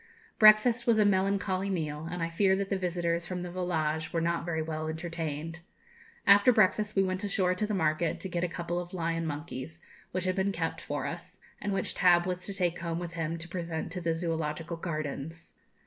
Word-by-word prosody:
Breakfast 225 +3 +6
was 230 -2 +5
a 210 - +5
melancholy 195 0 +1
meal, 155 -4 -2
and 175 -1 -3
I 165 - -1
fear 190 +3 +3
that 195 +1 -3
the - - +3
visitors 175 -2 -1
from 180 -1 -4
the 175 - -6
'Volage' 160 -4 -1
were 170 - 0
not 170 0 0
very 160 -2 -1
well 155 0 -3
entertained. 160 -1 -4 0.7
After 200 +4 +7
breakfast, 215 -1 +3
we 195 - +4
went 185 +1 -2
ashore 195 -3 +1
to 210 +3 -1
the 210 - -1
market, 155 -2 +1
to - - -3
get 175 -1 -2
a - - +2
couple 175 0 -3
of 175 +1 -7
lion 165 -1 -1
monkeys, 150 0 -6 0.3
which 185 0 -2
had 185 0 0
been 195 +1 +1
kept 165 -3 -3
for 145 0 -3
us, 175 +2 -7 0.2
and 205 - -2
which 195 - -1
Tab 175 -1 +5
was 180 -1 -2
to 200 - -4
take 180 -2 0
home 170 -1 -2
with 175 -1 -5
him 165 0 -2
to 165 +1 -8
present 170 -2 -4
to 180 - -4
the 165 -1 0
Zoological 165 0 -2
Gardens. 160 -1 -5
175 Hz, 210 wpm, -30 LUFS, 165-190 Hz, 0.7 s, After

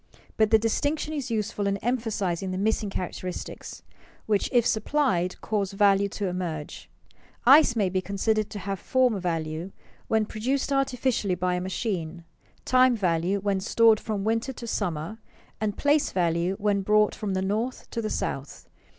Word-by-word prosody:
But 220 -1 +3
the 220 - +6
distinction 285 +8 -1
is 280 -4 -3
useful 215 -2 -1
in 200 0 0
emphasizing 210 -6 -1
the 185 - -3
missing 215 +1 0
characteristics, 180 -1 -6 0.4
which 210 -2 +1
if 240 -3 +3
supplied, 220 -7 +1
cause 200 -3 -1
value 200 0 +3
to 205 0 -4
emerge. 175 -5 -4 0.6
Ice 270 -1 +7
may 205 -4 +2
be 185 0 -1
considered 210 +2 0
to - - -7
have 195 -1 -4
form 250 -3 +2
value 165 0 -3 0.4
when 220 -1 +2
produced 260 +7 -1
artificially 255 -7 0
by 180 0 0
a 180 - -1
machine, 180 -3 -3 0.4
time 255 -1 +5
value 180 -1 0
when 200 -1 0
stored 220 +2 +4
from 210 -3 -3
winter 225 +5 0
to 240 - -8
summer, 180 -2 -3 0.4
and 210 -2 -2
place 290 +1 +2
value 175 +1 0
when 205 -1 +1
brought 210 +1 +3
from 200 -3 -3
the 185 - 0
north 220 +6 -2
to 230 - -2
the 215 - -2
south. 135 -7 -4
205 Hz, 160 wpm, -26 LUFS, 185-230 Hz, 0.6 s, Ice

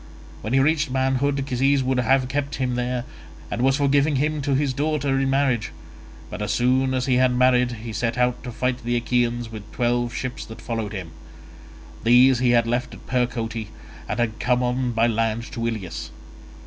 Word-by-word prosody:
When 110 +4 -4
he 135 - +5
reached 150 +1 +2
manhood, 135 +1 0
Cisses 135 +1 +2
would 130 0 0
have 130 +2 +2
kept 140 +1 -2
him 130 -2 -1
there, 125 0 -2 0.5
and - - -2
was 135 +1 +3
for 140 - +2
giving 145 +1 +3
him 150 +2 0
his 140 -1 0
daughter 145 -1 0
in 135 0 +1
marriage, 135 -5 +1 0.6
but - - -7
as - - -1
soon 130 +2 +2
as 130 0 0
he 130 -2 +2
had 130 0 +4
married 125 -1 +3
he 115 -2 -6
set 115 +2 -1
out 125 0 +1
to 125 - -6
fight 125 +1 -2
the 120 +1 -1
Achaeans 120 -1 0
with 110 -1 -9
twelve 120 0 0
ships 125 +2 -4
that 110 +1 -10
followed 115 -2 -4
him: 90 -5 -6 0.9
these 125 +2 +6
he 125 -1 +2
had 120 -1 +4
left 120 +2 -2
at - - -15
Percote 115 -3 -2 0.4
and - - -2
had 115 -2 -1
come 125 0 +1
on 125 0 0
by 115 0 +2
land 115 0 0
to 115 -1 -2
Ilius. 110 -7 -5
125 Hz, 190 wpm, -23 LUFS, 120-135 Hz, 0.9 s, these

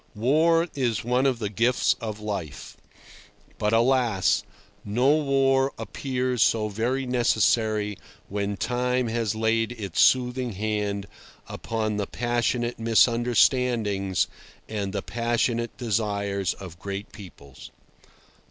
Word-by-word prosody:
War 160 +9 +3
is 125 -5 -1
one 125 +3 +2
of 130 -3 +1
the 110 -2 -3
gifts 120 +5 +2
of 110 -2 -5
life; 100 -8 -6 0.8
but, 105 - +1
alas! 115 -4 +2 0.4
no 120 +6 +1
war 135 -2 +2
appears 125 +2 -2
so 110 -2 +3
very 120 +6 -1
necessary 110 -4 +1 0.3
when 100 0 -3
time 125 +4 0
has 110 -2 -1
laid 115 +1 0
its 100 -7 -2
soothing 125 -1 +2
hand 105 -1 -2 0.4
upon 110 -2 -3
the 100 -1 -2
passionate 120 0 -1
misunderstandings 115 -4 +2 0.4
and 100 -3 -3
the 100 -1 -3
passionate 120 0 -1
desires 100 -4 -1
of 90 -3 -11
great 100 +1 -6
peoples. 70 - -12
115 Hz, 110 wpm, -25 LUFS, 105-125 Hz, 0.8 s, War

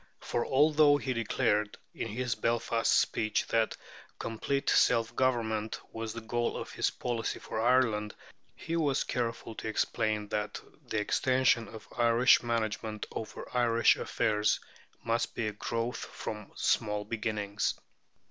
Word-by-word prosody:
For 120 - -1
although 145 +1 +5
he 135 -2 -2
declared, 105 -2 0 0.2
in - - -4
his 120 +2 -2
Belfast 115 +1 0
speech, 110 -1 +2
that 115 -1 +1 0.4
"complete 135 +5 -2
self 115 -1 +3
government" 110 -4 0
was 115 0 -4
the 115 +1 -6
goal 120 +2 -1
of - - -6
his - - +1
policy 120 -2 -3
for 110 - -4
Ireland, 115 -4 +2 0.4
he 165 - -4
was 145 -5 +1
careful 115 -2 -3
to 110 - -6
explain 110 -1 0
that 105 0 -2 0.3
"the 110 - -2
extension 125 +1 +2
of 110 0 -11
Irish 120 +1 +5
management 110 -2 -2
over 110 - -6
Irish 115 -1 +4
affairs 105 0 +1 0.4
must 115 +1 -1
be 120 - -1
a 105 - -1
growth 115 +3 -2
from 105 -2 -7
small 105 -2 0
beginnings." 105 -2 -2
115 Hz, 135 wpm, -30 LUFS, 110-120 Hz, 0.4 s, although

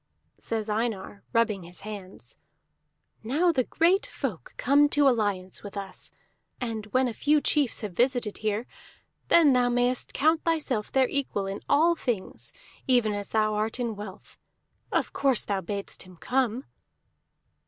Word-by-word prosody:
Says 225 -2 -3
Einar, 210 -2 -2
rubbing 230 -4 +2
his 175 +1 -9
hands: 200 -3 -9 0.8
"Now 300 +10 +2
the 260 -6 +1
great 370 +8 +2
folk 225 - -5
come 290 +3 +4
to 290 -1 +4
alliance 205 -7 0
with 205 0 -8
us; 195 -1 -5 0.5
and 225 -3 -4
when 255 +4 +2
a 240 - -3
few 300 +5 +3
chiefs 290 -3 +1
have 210 -3 -4
visited 245 0 +1
here, 215 +2 -1 0.6
then 315 -5 +6
thou 250 -1 +3
mayest 245 +1 +2
count 315 +3 +3
thyself 295 -10 -1
their 265 -1 +3
equal 260 -8 -1
in 195 +1 -5
all 335 +4 +4
things, 240 - -3 0.4
even 240 -5 +3
as 205 -1 -4
thou 215 -1 +2
art 215 +3 -1
in 235 -3 -2
wealth. 205 -2 -10 0.5
Of - - 0
course 270 -4 +2
thou 200 -2 -1
badst 200 +2 -5
him 185 -2 -12
come?" 250 +3 0
230 Hz, 150 wpm, -27 LUFS, 205-270 Hz, 0.8 s, then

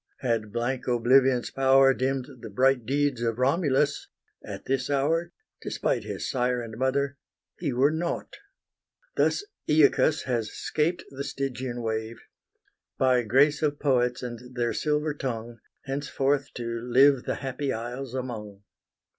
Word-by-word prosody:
Had 115 -4 -1
blank 120 +3 -2
oblivion's 125 +1 +3
power 135 0 +5
Dimm'd 130 0 -1
the - - -7
bright 125 +2 +2
deeds 140 -2 +1
of 115 -1 -1
Romulus, 140 +1 +1 0.4
at - - -8
this 130 0 -1
hour, 160 +5 +1 0.3
Despite - - -1
his - - -4
sire 125 -1 0
and 115 -2 -7
mother, 135 +3 0 0.4
he 155 -5 -1
were 130 +4 +3
nought. 170 +2 -3 0.8
Thus 410 - +1 0.2
Aeacus 155 0 +4
has 115 -4 -1
'scaped 165 +4 -1
the 140 0 -5
Stygian 130 -3 -4
wave, 110 +1 -3 0.8
By 130 -1 +3
grace 135 +6 +3
of 145 -2 +1
poets 125 -3 +1
and 125 +1 -8
their 120 -1 0
silver 150 0 0
tongue, 120 -4 -5 0.2
Henceforth 140 0 -1
to 115 -1 -3
live 130 +2 +4
the - - -1
happy 135 +1 -3
isles 120 +3 -5
among. 105 -6 -6
130 Hz, 135 wpm, -27 LUFS, 120-140 Hz, 0.8 s, power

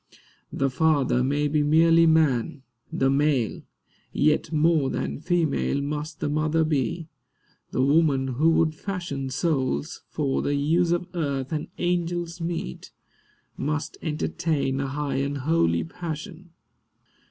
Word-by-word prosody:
The 135 -1 0
father 140 -3 +2
may 145 +3 +1
be 150 +1 +1
merely 165 +2 +5
man, 145 -4 +2 0.3
the 135 - +1
male; 140 -5 +1 0.5
Yet 150 +2 +1
more 155 -3 +3
than - - -3
female 160 -3 0
must 150 +2 -4
the - - 0
mother 155 +2 +1
be. 155 +1 -1 0.6
The 130 - 0
woman 140 -2 +3
who 145 +6 +2
would 160 -1 +2
fashion 155 -6 -4
Souls, 145 +1 -1
for 140 -3 -1
the 145 - 0
use 165 +5 +2
of 175 +1 0
earth 140 -6 -2
and 155 -1 -2
angels 175 -1 -2
meet, 165 - -4 0.7
Must 150 +1 -2
entertain 150 -3 -1
a 135 - -1
high 140 0 -2
and 140 +1 -1
holy 130 - +1
passion. 170 - -7
150 Hz, 130 wpm, -25 LUFS, 135-165 Hz, 0.7 s, merely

